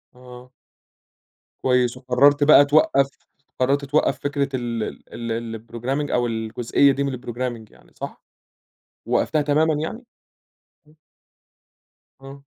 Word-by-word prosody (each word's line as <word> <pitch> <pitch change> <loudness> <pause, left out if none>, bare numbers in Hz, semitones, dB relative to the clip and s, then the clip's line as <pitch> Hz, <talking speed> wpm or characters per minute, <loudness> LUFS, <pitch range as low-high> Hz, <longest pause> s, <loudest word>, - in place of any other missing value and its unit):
آه. 125 0 -14 1.1
كويّس، 125 -1 +2
وقررت 140 +3 +3
بقى 145 -1 +7
توقف 140 -2 +3 0.5
قررت 140 +2 +1
توقف 150 +3 +1
فكرة 140 -1 -1
ال 120 -3 -3 0.3
ال 115 -1 -5
ال 115 -1 -4
الprogramming 130 +5 -3
أو 120 -1 +1
الجزئية 115 +4 +1
دي 140 +1 -1
من 140 - -2
الprogramming 120 -2 -5
يعني - - -23
صح؟ - - -8 0.8
وقفتها 155 -2 +1
تمامًا 155 +2 +2
يعني؟ 160 +12 -5 0.8
إمم. 150 - -23 1.3
آه. 140 +1 -12
130 Hz, 115 wpm, -22 LUFS, 120-145 Hz, 1.3 s, بقى